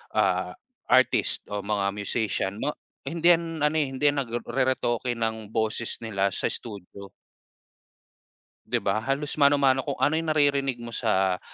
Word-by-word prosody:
ah, -, -, +1 dB, 0.4 s
artist -, -, +3 dB
o 105 Hz, -, -1 dB
mga 100 Hz, 0 st, -1 dB
musician 100 Hz, -1 st, -2 dB
'no, 150 Hz, -, +1 dB, 0.3 s
hindi 170 Hz, +1 st, +2 dB
yan 165 Hz, -1 st, -5 dB
ano, 150 Hz, +1 st, +2 dB
eh 145 Hz, -3 st, +2 dB
hindi 135 Hz, +2 st, -6 dB
yan 145 Hz, -, -2 dB
nagru 120 Hz, 0 st, -4 dB
reretoke 130 Hz, -2 st, 0 dB
ng 110 Hz, -2 st, -3 dB
boses 110 Hz, +1 st, -1 dB
nila 100 Hz, -3 st, 0 dB
sa -, -, 0 dB
studio. 100 Hz, -2 st, -8 dB, 1.6 s
Di -, -, 0 dB
ba, 100 Hz, +2 st, +1 dB
halos 140 Hz, +5 st, -2 dB
mano-mano 140 Hz, -2 st, +4 dB
kung 140 Hz, -, -1 dB
ano 145 Hz, -, +3 dB
yung 165 Hz, -1 st, -3 dB
naririnig 140 Hz, -4 st, +2 dB
mo 115 Hz, -, -7 dB
sa, 95 Hz, -6 st, +1 dB
120 Hz, 150 wpm, -26 LUFS, 105-140 Hz, 1.6 s, mano-mano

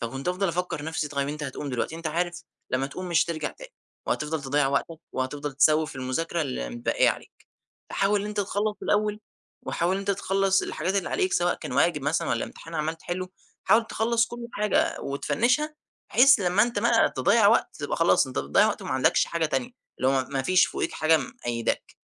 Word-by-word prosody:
فكنت 135 Hz, +5 st, -4 dB
أفضل 185 Hz, +1 st, 0 dB
أفكر 170 Hz, -3 st, -3 dB
نفسي: 160 Hz, -1 st, -2 dB
طب 145 Hz, -1 st, -6 dB
أنت 145 Hz, +2 st, -2 dB
هتقوم 140 Hz, +1 st, -5 dB
دلوقتي، 125 Hz, +5 st, -2 dB
أنت 165 Hz, 0 st, -5 dB
عارف 175 Hz, +2 st, -2 dB, 0.3 s
لما 130 Hz, +1 st, 0 dB
تقوم 180 Hz, +6 st, -7 dB
مش 170 Hz, -, +3 dB
هترجع 155 Hz, -2 st, -3 dB
تاني، -, -, -13 dB, 0.3 s
وهتفضل 150 Hz, -1 st, -1 dB
تضيّع 135 Hz, 0 st, +1 dB
وقتك، 155 Hz, +3 st, -1 dB
وهتفضل 145 Hz, +3 st, -3 dB
تسوف 155 Hz, +3 st, +3 dB
في -, -, -10 dB
المذاكرة 160 Hz, +6 st, -2 dB
المتبقية 240 Hz, -, 0 dB
عليك، -, -, -10 dB, 0.4 s
فحاول 200 Hz, +1 st, +1 dB
إن 205 Hz, -, -4 dB
أنت 210 Hz, 0 st, -2 dB
تخلص 205 Hz, +2 st, -1 dB
الأول، 210 Hz, 0 st, +1 dB, 0.4 s
وحاول 170 Hz, +2 st, -1 dB
إن -, -, -1 dB
أنت 200 Hz, 0 st, -1 dB
تخلص 195 Hz, 0 st, +1 dB
الحاجات 180 Hz, +5 st, -2 dB
اللي 195 Hz, -, 0 dB
عليك، 375 Hz, -1 st, 0 dB
سواء 175 Hz, 0 st, +2 dB
كان -, -, -7 dB
واجب 150 Hz, +2 st, +2 dB
مثلًا 145 Hz, +3 st, 0 dB
والّا 115 Hz, -, 0 dB
امتحان 165 Hz, 0 st, -11 dB
عَمّال 160 Hz, +1 st, -2 dB
تحله، 185 Hz, +2 st, -4 dB, 0.4 s
حاول 225 Hz, 0 st, +4 dB
تخلص 230 Hz, +1 st, +1 dB
كل 240 Hz, 0 st, -7 dB
حاجة 210 Hz, 0 st, +1 dB
وتفنشها، 240 Hz, -, 0 dB, 0.4 s
بحيث 270 Hz, -1 st, +6 dB
لما 185 Hz, +2 st, +3 dB
أنت 240 Hz, +1 st, 0 dB
بقى -, -, +3 dB
تضيّع -, -, +4 dB
وقت -, -, +2 dB
تبقى -, -, -2 dB
خلاص -, -, +4 dB
أنت -, -, -5 dB
بتضيع -, -, +3 dB
وقت -, -, -3 dB
وما -, -, -6 dB
عندكش -, -, +3 dB
حاجة 165 Hz, -1 st, 0 dB
تانية، 245 Hz, +9 st, -2 dB, 0.3 s
اللي 130 Hz, -, +2 dB
هو 135 Hz, -1 st, +2 dB
مافيش 140 Hz, +7 st, +3 dB
فوقيك -, -, -3 dB
حاجة 160 Hz, +1 st, +3 dB
مقيداك. 120 Hz, -3 st, -3 dB
170 Hz, 190 wpm, -26 LUFS, 145-205 Hz, 0.4 s, بحيث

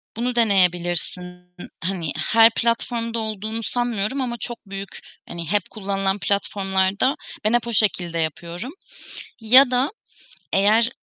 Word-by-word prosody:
Bunu 245 Hz, +2 st, -2 dB
deneyebilirsin. 180 Hz, -3 st, 0 dB, 0.3 s
Hani 170 Hz, -4 st, -2 dB
her 225 Hz, +8 st, +5 dB
platformda 230 Hz, 0 st, -1 dB
olduğunu 220 Hz, +1 st, -4 dB
sanmıyorum 240 Hz, +1 st, -1 dB
ama 240 Hz, -2 st, -3 dB
çok 240 Hz, +1 st, -5 dB
büyük 195 Hz, 0 st, -8 dB, 0.3 s
hani 170 Hz, -1 st, -6 dB
hep 205 Hz, -3 st, 0 dB
kullanılan 195 Hz, -1 st, -1 dB
platformlarda, 200 Hz, +4 st, 0 dB, 0.3 s
ben 215 Hz, -, +3 dB
hep 240 Hz, -1 st, +1 dB
o 235 Hz, -, -3 dB
şekilde 180 Hz, -6 st, +1 dB
yapıyorum 170 Hz, -, -4 dB, 0.7 s
ya 250 Hz, +4 st, +7 dB
da 255 Hz, +4 st, +1 dB, 0.6 s
eğer 215 Hz, +4 st, +4 dB
205 Hz, 120 wpm, -22 LUFS, 190-235 Hz, 0.7 s, ya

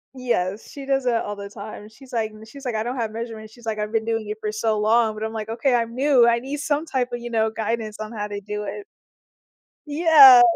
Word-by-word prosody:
Yes, 215 Hz, -6 st, -1 dB
she 275 Hz, -1 st, -9 dB
does 270 Hz, -1 st, +1 dB
it 245 Hz, -, +2 dB
all 205 Hz, -2 st, -1 dB
the 200 Hz, 0 st, -8 dB
time, 210 Hz, -1 st, -9 dB
she's 250 Hz, +4 st, -16 dB
like 220 Hz, -2 st, -1 dB
m 215 Hz, 0 st, -13 dB
she's 270 Hz, +5 st, -12 dB
like, 245 Hz, -, -1 dB
"I 215 Hz, -, -1 dB
don't 245 Hz, +3 st, -3 dB
have 225 Hz, -2 st, -2 dB
measurements." 220 Hz, -1 st, -7 dB
She's 240 Hz, -1 st, -16 dB
like, 215 Hz, -1 st, -1 dB
"I've 210 Hz, 0 st, -3 dB
been 225 Hz, -1 st, 0 dB
doing 225 Hz, -2 st, -1 dB
it 210 Hz, +1 st, -5 dB
for 210 Hz, -, -2 dB
so 220 Hz, 0 st, 0 dB
long." 220 Hz, +1 st, +3 dB
But 215 Hz, +1 st, -6 dB
I'm 220 Hz, 0 st, -3 dB
like, 220 Hz, 0 st, -5 dB
"Okay, 245 Hz, +3 st, +1 dB
I'm 230 Hz, -1 st, 0 dB
new. 260 Hz, -2 st, +4 dB
I 235 Hz, 0 st, +4 dB
need 275 Hz, +4 st, -5 dB
some 290 Hz, +2 st, 0 dB
type 250 Hz, -3 st, 0 dB
of, 240 Hz, -, -2 dB
you 240 Hz, 0 st, -6 dB
know, 220 Hz, -1 st, +1 dB
guidance 220 Hz, -1 st, -3 dB
on 215 Hz, +1 st, -5 dB
how 210 Hz, -2 st, -4 dB
to 205 Hz, 0 st, -5 dB
do 210 Hz, +1 st, -4 dB
it." 400 Hz, -, -6 dB, 1.0 s
Yeah. 290 Hz, -5 st, +8 dB
225 Hz, 255 wpm, -23 LUFS, 215-250 Hz, 1.0 s, Yeah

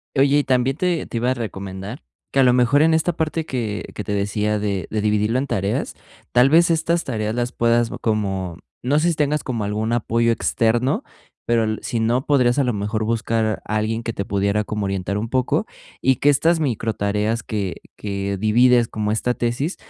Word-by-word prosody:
Oye, 140 Hz, +1 st, +4 dB
y -, -, +1 dB
también 130 Hz, 0 st, +1 dB
te 180 Hz, -2 st, 0 dB
te -, -, -4 dB
iba 120 Hz, +2 st, +1 dB
a -, -, +3 dB
recomendar 100 Hz, -1 st, -6 dB, 0.3 s
que 135 Hz, -, +1 dB
a -, -, +7 dB
lo 125 Hz, -1 st, +5 dB
mejor 125 Hz, +4 st, +4 dB
en 160 Hz, 0 st, +4 dB
esta 160 Hz, +2 st, +1 dB
parte 160 Hz, 0 st, -2 dB
que 110 Hz, -5 st, -3 dB
que 105 Hz, -, -4 dB
te 100 Hz, -, -3 dB
decía 105 Hz, +1 st, 0 dB
de 100 Hz, -4 st, -2 dB
de 110 Hz, -, -1 dB
dividirlo 105 Hz, +3 st, +1 dB
en 140 Hz, -, -3 dB
tareas, 100 Hz, -2 st, -2 dB, 0.4 s
tal 125 Hz, +3 st, +5 dB
vez, 170 Hz, +2 st, +5 dB
estas 165 Hz, +1 st, +1 dB
tareas 110 Hz, -4 st, -2 dB
las 120 Hz, +1 st, -1 dB
puedas 115 Hz, 0 st, +2 dB
bo -, -, -6 dB
como 95 Hz, -6 st, -2 dB, 0.2 s
no 140 Hz, +5 st, +2 dB
sé 170 Hz, +2 st, +2 dB
si 165 Hz, -, 0 dB
tengas 150 Hz, 0 st, 0 dB
como 120 Hz, -5 st, -3 dB
algún 105 Hz, +2 st, -2 dB
apoyo 115 Hz, 0 st, +1 dB
externo, 120 Hz, -, +1 dB, 0.4 s
pero, 115 Hz, -1 st, +2 dB
el 110 Hz, 0 st, -2 dB
sí 115 Hz, -, -2 dB
no, 120 Hz, +4 st, +1 dB
podrías 125 Hz, -4 st, +3 dB
a -, -, +4 dB
lo 125 Hz, -, +1 dB
mejor, 105 Hz, +2 st, -2 dB
buscar 110 Hz, -1 st, 0 dB
alguien 110 Hz, +1 st, -1 dB
que 115 Hz, -, -3 dB
te 100 Hz, -, -3 dB
pudiera 100 Hz, +1 st, 0 dB
como 105 Hz, -1 st, -3 dB
orientar 95 Hz, +1 st, -2 dB
un 110 Hz, +2 st, -2 dB
poco 130 Hz, 0 st, +1 dB, 0.4 s
y 130 Hz, -1 st, +3 dB
que 145 Hz, -, +3 dB
estas 160 Hz, +4 st, +3 dB
microtareas 110 Hz, -3 st, -1 dB
que 100 Hz, -6 st, -3 dB, 0.2 s
que 100 Hz, -1 st, -3 dB
divides 120 Hz, +3 st, +4 dB
como 105 Hz, -1 st, -2 dB
esta 125 Hz, +3 st, 0 dB
tesis, 120 Hz, +9 st, -2 dB
115 Hz, 200 wpm, -21 LUFS, 105-130 Hz, 0.4 s, a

